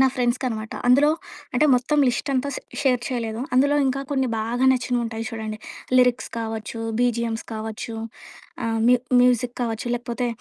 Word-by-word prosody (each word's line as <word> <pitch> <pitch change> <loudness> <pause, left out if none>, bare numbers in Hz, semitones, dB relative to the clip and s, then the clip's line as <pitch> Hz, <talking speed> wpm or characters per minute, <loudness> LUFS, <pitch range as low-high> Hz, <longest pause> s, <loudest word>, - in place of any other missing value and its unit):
నా 265 - +7
ఫ్రెండ్స్‌కనమాట. 240 -3 -1
అందులో 275 +4 +6 0.5
అంటే 300 +5 +4
మొత్తం 260 +5 +1
లిస్ట్ 245 +3 -2
అంతా 260 +2 0
స్ - - -3 0.2
షేర్ 255 -3 +3
చేయలేదు 230 -3 -3
అందులో 285 +3 +4
ఇంకా 265 +1 0
కొన్ని 265 -2 +1
బాగా 235 +4 0
నచ్చినవుంటాయి 240 -3 -1
చూడండి 220 -1 -5 0.4
లిరిక్స్ 250 -1 +3
కావచ్చు 225 0 -4 0.2
బీజీఎమ్స్ 235 -2 0
కావచ్చు 220 +1 -5 0.7
ఆహ్ 225 0 0
మ్యూ 250 - +6 0.2
మ్యూజిక్ 245 -1 +2
కావచ్చు 230 0 -2
లేకపోతే 240 +1 -3
245 Hz, 145 wpm, -23 LUFS, 225-255 Hz, 0.7 s, నా